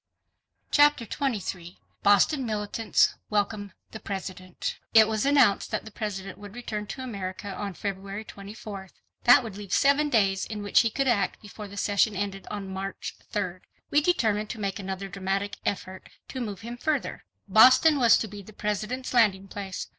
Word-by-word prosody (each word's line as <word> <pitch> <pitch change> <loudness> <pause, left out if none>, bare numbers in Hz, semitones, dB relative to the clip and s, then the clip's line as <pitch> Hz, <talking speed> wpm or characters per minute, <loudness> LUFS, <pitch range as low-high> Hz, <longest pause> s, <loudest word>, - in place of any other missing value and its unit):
Chapter 290 -4 +5
23 200 -9 -3 0.2
Boston 205 +8 +4
Militants 215 -1 +1 0.2
Welcome 205 -1 -1 0.2
the 220 - -7
President 185 -3 -5 0.2
It 220 -1 +8
was 220 +3 0
announced 280 -8 +4
that - - -3
the 220 - -9
President 195 -3 -5
would 205 +1 -11
return 210 -4 -5
to 260 - -6
America 200 -4 -5
on 200 -1 -5
February 200 +1 -5
24th. 200 -1 -9 0.3
That 245 +1 +8
would 215 -4 -7
leave 205 -3 -9
seven 285 +2 +3
days 195 -6 +2
in 210 -2 -5
which 205 - +4
he 230 - +3
could 270 +4 -1
act 205 -6 +1
before 210 0 -9
the 200 +1 -11
session 205 +1 +2
ended 195 0 -4
on 205 -2 -5
March 190 +1 -5 0.2
3d. - - -2 0.3
We 295 - +5
determined 220 -11 +1
to 230 - -6
make 195 -2 -2
another 195 0 -5
dramatic 195 +1 -2
effort 190 -1 -4 0.2
to 260 - -5
move 205 -5 -5
him 235 +2 -7
further. 300 0 -2 0.2
Boston 255 +9 +7
was 235 -3 +6
to 220 - -2
be 205 0 -9
the 215 +2 -14
President's 215 +6 -3
landing 200 -5 +3
place. 195 -1 -5
205 Hz, 170 wpm, -27 LUFS, 195-230 Hz, 0.3 s, It